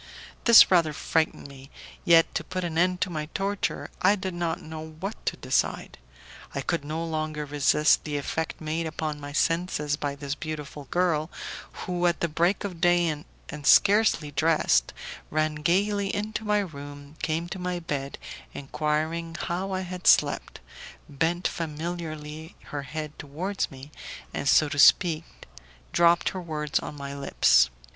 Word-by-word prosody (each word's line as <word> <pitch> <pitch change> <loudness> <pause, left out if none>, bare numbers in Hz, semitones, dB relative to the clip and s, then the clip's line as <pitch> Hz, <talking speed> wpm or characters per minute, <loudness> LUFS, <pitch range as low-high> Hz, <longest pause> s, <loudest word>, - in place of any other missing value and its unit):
This 235 -4 +9
rather 165 -4 +4
frightened 160 0 -1
me. 135 -1 -13 0.3
Yet, 165 -1 +5
to - - -2
put 185 0 -4
an 170 -2 -3
end 180 +2 +2
to 185 - 0
my 155 -2 -3
torture, 200 +1 -2
I 200 +3 +5
did 190 -2 -4
not 170 -1 -2
know 155 0 -8 0.2
what 195 +5 -5
to - - 0
decide. - - -1 0.6
I 140 - -1
could 165 +2 -1
no 155 +3 -3
longer 155 -2 -3
resist 145 +1 +3
the 150 -2 -3
effect 160 +3 -3
made 160 +1 -2
upon 155 -1 -4
my 145 0 -7
senses 155 -2 0
by 145 -1 -3
this 140 -1 -4
beautiful 150 -1 -6
girl, 165 -1 0 0.6
who, 175 -1 0
at 170 - 0
the 170 - +1
break 170 +5 +1
of 180 -5 -6
day 175 -1 +4 0.4
and 150 -1 -6
scarcely 195 -8 +5
dressed, 145 - +2 0.4
ran 155 0 0
gaily 195 +7 +1
into 215 +1 -3
my 210 0 +2
room, 145 -4 -9
came 165 +2 -1
to 185 - -6
my 180 0 -2
bed 140 -4 -4 0.4
enquiring 155 +4 -2
how 185 +3 -3
I 185 0 -1
had 180 -1 -5
slept, - - +3 0.5
bent 165 +5 0
familiarly 160 -1 -5 0.2
her 145 - -3
head 155 +2 -6
towards 175 +8 -3
me, 135 +2 -12 0.4
and, 140 - -1
so 155 - +5
to 145 0 -3
speak, 165 +1 +5 0.7
dropped 170 0 +4
her 185 - -6
words 150 -3 -2
on - - -7
my 140 0 -6
lips. 60 - +4
160 Hz, 155 wpm, -26 LUFS, 150-175 Hz, 0.7 s, This